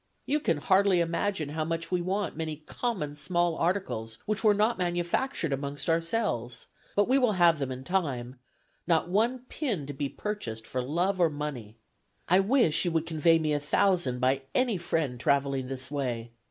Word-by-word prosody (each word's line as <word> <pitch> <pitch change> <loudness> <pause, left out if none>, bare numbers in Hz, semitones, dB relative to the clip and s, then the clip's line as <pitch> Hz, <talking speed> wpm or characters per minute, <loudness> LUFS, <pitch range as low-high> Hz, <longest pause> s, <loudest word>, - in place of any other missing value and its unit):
You 295 +2 +1
can 165 - +1
hardly 190 +3 +3
imagine 170 -1 -1
how 155 +1 -2
much 165 +1 -3
we 180 -1 +1
want 190 +1 -2
many 160 -1 -3
common 195 -12 -3
small 175 +2 0
articles 165 - -2
which 215 +1 -1
are 215 - +6
not 210 +2 +2
manufactured 175 - -1
amongst 140 +3 -2
ourselves; 165 - -1 0.3
but 205 0 +3
we 265 +3 +4
will 245 -5 +3
have 170 -4 +4
them 135 -2 -2
in 130 0 -6
time; 135 -8 -2 0.5
not 170 0 +2
one 235 +6 +1
pin 225 - -2
to 145 - -6
be 140 0 -3
purchased 120 - -5
for 130 - -2
love 175 +8 0
or 170 - +5
money. 140 -8 -6 0.5
I 180 +2 +5
wish 195 - +3
you 175 - +1
would 165 0 +1
convey 165 0 +3
me 155 -2 0
a 145 - +1
thousand 150 -3 +1
by 130 +2 +2
any 250 -5 +2
friend 155 -7 -2
traveling 140 0 +1
this 130 +1 -4
way. 120 -5 -3
165 Hz, 180 wpm, -28 LUFS, 140-195 Hz, 0.5 s, are